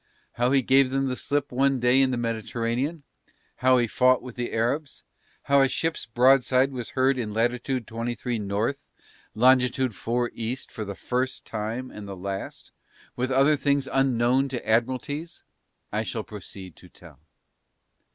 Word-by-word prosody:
How 120 +1 0
he 135 -1 +3
gave 135 +1 +4
them 135 0 0
the 125 - -2
slip 145 +1 -2
one 135 +1 +2
day 125 +2 +4
in 135 - +3
the 125 - -1
Mediterranean, 120 +6 -2 0.5
how 130 0 +4
he 120 - +3
fought 130 +2 +3
with 125 -2 -9
the 120 -1 -3
Arabs, 130 +6 -2 0.4
how 140 0 +4
a 135 - +5
ship's 160 +1 -2
broadside 130 +2 +4
was 125 -3 -6
heard 130 0 +3
in 105 -3 -4
Lat. 115 +2 +3
23 120 -1 -3
N. 105 -2 -5
Long. 105 +7 0 0.9
4 125 -1 -1
E. 115 +2 -3
for 115 -4 -7
the 100 0 -6
first 130 +4 -3
time 115 +4 -4
and 105 -1 -9
the 95 -1 -7
last, 95 +1 -6 0.4
with 130 +1 -1
other 135 +3 +4
things 140 -1 0
unknown 130 0 +2
to 125 -4 -5
Admiralties, 130 +8 -1 0.5
I 105 - 0
shall 110 0 -4
proceed 95 -4 -10
to 90 - -16
tell. 80 -7 -16
125 Hz, 160 wpm, -25 LUFS, 115-135 Hz, 0.9 s, a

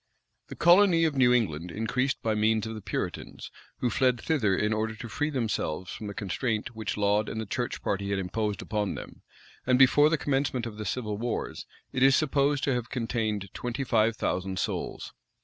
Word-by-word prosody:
[] - - -50
The - - -8
colony 175 0 +5
of 155 -3 +1
New 130 -2 +5
England 90 -9 +1
increased 125 +8 -1
by 110 - +1
means 110 0 +2
of 110 - -5
the 110 - -7
Puritans, - - -5 0.3
who 125 - +1
fled 125 -3 +2
thither 115 -12 +1
in 105 +1 +1
order 110 0 -1
to 115 - -7
free 150 +6 -1
themselves 105 - -2
from 105 - -6
the 100 - -6
constraint 110 +3 -2
which 110 -2 -3
Laud 105 +1 +2
and 110 - -4
the 110 - -3
church 120 +4 -3
party 100 0 -1
had 100 - 0
imposed 105 +2 -2
upon 105 -2 -2
them; - - -9 0.5
and, 125 -1 +4
before 145 +3 +6
the 165 - +2
commencement 135 -3 0
of 110 -3 -7
the 105 - -5
civil 105 0 -3
wars, 120 +1 -3 0.3
it 125 - -1
is 135 0 +6
supposed 145 -1 +2
to 135 - +2
have 125 -1 -3
contained 110 -5 -2
twenty 125 +3 -3
five 115 -3 +2
thousand 95 -2 -2
souls. - - -3
115 Hz, 200 wpm, -28 LUFS, 105-130 Hz, 0.5 s, before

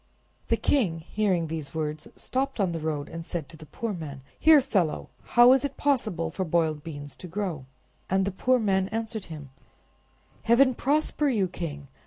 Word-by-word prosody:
The - - +2
king, 185 - +1
hearing 185 -1 0
these 160 -2 -5
words, 155 +3 -3
stopped 270 -1 -2
on 190 -3 +2
the 165 - -3
road, 150 -2 -2
and 165 0 -7
said 165 -3 -5
to - - -11
the 155 0 -13
poor 225 +8 -4
man— 145 -6 -7 0.2
"Here, 315 -2 +7
fellow! 200 - 0 0.3
how 240 +1 +9
is 265 - +2
it 280 -1 -3
possible 215 - 0
for 190 - -2
boiled 160 -3 0
beans 145 -3 -7
to 180 - -9
grow?" 170 -7 -4 0.4
And 190 +1 +2
the 200 - -1
poor 255 +7 +2
man 190 -4 +1
answered 220 0 -4
him— 150 -5 -9 0.9
"Heaven 255 +3 +5
prosper 295 +3 +1
you, 210 -7 +1
king! 145 -5 -6
185 Hz, 180 wpm, -27 LUFS, 160-235 Hz, 0.9 s, how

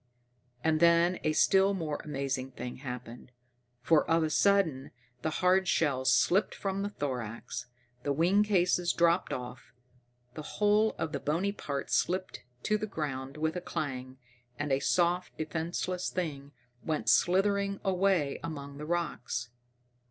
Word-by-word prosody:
And 160 -1 +2
then 170 +1 +4
a 155 - +2
still 195 +4 +4
more 155 -5 -3
amazing 135 -3 -3
thing 125 0 -6
happened. 125 -2 -8 0.5
For 160 +1 +3
of 165 0 +3
a 155 - -1
sudden 165 -8 +2 0.3
the 160 - 0
hard 185 +4 +2
shell 140 -6 +1
slipped 175 +9 +3
from 195 0 -2
the 200 - -2
thorax, 125 - -5 0.3
the 145 - -1
wing 175 +8 +3
cases 180 -4 +2
dropped 170 +1 +2
off, 125 -1 -7 0.6
the 155 - -6 0.2
whole 210 +1 +3
of 160 - -2
the 140 - -3
bony 165 +9 0
parts 145 -8 -4
slipped 185 +1 -1 0.2
to 215 0 +1
the 215 - -3
ground 140 -6 -4
with 160 +2 -1
a 180 - -3
clang, 130 -6 -4 0.4
and 145 +1 -2
a 135 - +3
soft, 175 +4 +1
defenseless 170 +3 -2
thing 145 -6 -4 0.3
went 155 -2 -2
slithering 200 +2 +3
away 185 -6 +1
among 140 -3 -6
the 150 - -6
rocks. 170 -8 -2
160 Hz, 145 wpm, -30 LUFS, 140-185 Hz, 0.6 s, then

